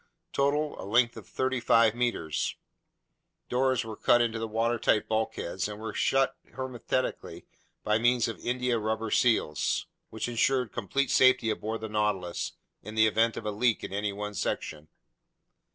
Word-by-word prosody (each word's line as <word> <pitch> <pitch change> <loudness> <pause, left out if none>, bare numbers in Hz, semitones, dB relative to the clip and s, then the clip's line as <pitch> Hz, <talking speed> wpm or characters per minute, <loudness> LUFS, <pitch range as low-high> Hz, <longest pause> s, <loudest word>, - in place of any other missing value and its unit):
Total: 145 +2 0
a - - -7
length 120 +4 +2
of - - -10
35 115 -4 +2
meters. 120 -10 -1 0.9
Doors 130 -1 +1
were 110 -1 -6
cut 120 - +4
into 115 -1 0
the 115 - -3
watertight 115 0 +1
bulkheads 110 -4 -2
and 105 0 -7
were 110 0 -5
shut 135 0 +2 0.2
hermetically 130 0 -3 0.4
by 105 +1 +2
means 120 0 +3
of 115 - -5
india 125 -1 0
rubber 110 0 -2
seals, 115 -11 +1 0.2
which 110 - -4
insured 125 0 +1
complete 130 +5 -1
safety 130 -3 +5
aboard 110 +1 -4
the 110 - -4
Nautilus 105 -5 -1 0.3
in 110 +2 -9
the 110 0 +5
event 110 +1 +2
of 110 - -6
a 105 - -1
leak 115 +2 +1
in - - -6
any 100 +1 -1
one 105 +1 -5
section. 75 -5 -3
115 Hz, 150 wpm, -28 LUFS, 105-125 Hz, 0.9 s, safety